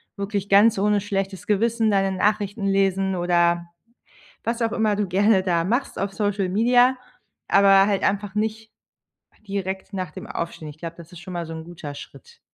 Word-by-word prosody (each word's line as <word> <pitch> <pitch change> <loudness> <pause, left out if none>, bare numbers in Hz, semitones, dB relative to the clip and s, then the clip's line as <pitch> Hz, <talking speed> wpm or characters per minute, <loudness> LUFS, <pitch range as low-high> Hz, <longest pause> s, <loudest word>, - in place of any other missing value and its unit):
wirklich 200 0 -3
ganz 205 +3 +5
ohne 205 +1 +2
schlechtes 195 -2 -3
Gewissen 225 +1 +1
deine 195 -1 +1
Nachrichten 205 +1 0
lesen 195 -1 +1
oder 175 -1 +2 0.8
was 235 +1 -2
auch 230 0 0
immer 215 -3 +1
du 205 -1 0
gerne 195 +2 +3
da 170 -3 +1
machst 240 +10 -1
auf 195 0 -2
Social 200 -1 -1
Media 245 +6 +4 0.6
aber 195 0 +6
halt 200 -2 0
einfach 200 0 -1
nicht 220 +1 -3 0.8
direkt 195 0 -4
nach 185 -4 -3
dem - - -9
Aufstehen. 165 -2 -5
Ich 150 - -10
glaube, 170 0 -7
das 170 -1 -12
ist 175 - -11
schon 185 +1 -9
mal 170 -1 -4
so 165 - -7
'n 160 0 -7
guter 160 -4 -8
Schritt. 470 - -13
195 Hz, 175 wpm, -23 LUFS, 180-210 Hz, 0.8 s, aber